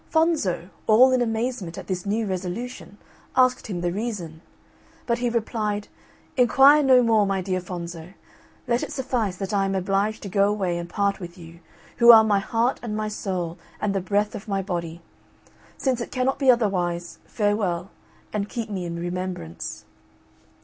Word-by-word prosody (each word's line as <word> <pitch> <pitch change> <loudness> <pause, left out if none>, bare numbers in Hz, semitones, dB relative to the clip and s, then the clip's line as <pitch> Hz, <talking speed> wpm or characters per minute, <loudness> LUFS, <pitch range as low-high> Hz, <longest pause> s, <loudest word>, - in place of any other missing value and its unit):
Fonzo, 310 - +1 0.2
all 245 +4 +7
in 255 -1 +2
amazement 225 -6 -2
at - - -7
this 185 0 -4
new 220 +2 0
resolution, 195 +4 -5 0.4
asked 255 -1 +3
him 180 -5 -4
the 175 0 0
reason: 185 -6 -4 0.6
but 235 0 0
he 245 0 0
replied, 215 -3 -2 0.5
"Enquire 270 +4 +6
no 260 -3 +5
more, 220 -3 +3
my 195 -1 0
dear 185 0 -2
Fonzo, 175 0 -7 0.5
let 240 0 +1
it - - -4
suffice 250 -9 -2
that 195 +2 -4
I 200 -1 +2
am 195 0 -1
obliged 195 +3 0
to - - -5
go 200 +1 +2
away 190 -4 -1
and 170 0 -6
part 200 0 0
with 175 0 -9
you, 170 -1 -12 0.4
who 235 0 +9
are 225 -1 +9
my 205 -2 +2
heart 230 +5 0
and 215 -3 -4
my 215 0 -2
soul 180 -5 -4 0.2
and 210 -1 0
the 195 - 0
breath 205 +3 0
of 210 - -8
my 195 -2 -1
body. 170 -3 -4 0.7
Since 255 -3 0
it - - -5
cannot 260 +1 0
be 270 -2 +3
otherwise, 180 -7 +1
farewell, 200 -4 -1 0.4
and 210 -1 -2
keep 230 -2 -4
me 185 -3 -3
in 170 -1 -4
remembrance." 175 - -5
205 Hz, 170 wpm, -24 LUFS, 180-235 Hz, 0.7 s, who